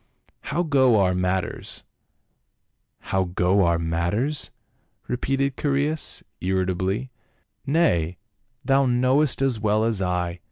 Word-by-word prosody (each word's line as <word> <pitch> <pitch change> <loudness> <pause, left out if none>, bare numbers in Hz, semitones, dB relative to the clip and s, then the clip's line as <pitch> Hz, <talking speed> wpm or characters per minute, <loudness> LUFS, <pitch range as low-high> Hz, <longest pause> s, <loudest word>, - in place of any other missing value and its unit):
" - - -37
How 170 +4 +1
go 130 -8 +4
our 90 -2 +3
matters 90 0 -2 0.3
?" - - -50
" - - -52
How 95 -1 +2
go 90 +2 +2
our 85 0 +2
matters?" 85 - -1 0.6
repeated 135 +2 -1
Chaereas 145 +2 0 0.2
irrita 95 0 0
bly. 100 +8 -2 0.3
" 95 +8 -47
Nay, 95 - +2 0.5
thou 135 0 +3
knowest 130 +3 +2
as 130 -5 +1
well 105 0 +1
as 110 -4 0
I. 90 -1 -1
105 Hz, 130 wpm, -24 LUFS, 90-135 Hz, 0.6 s, go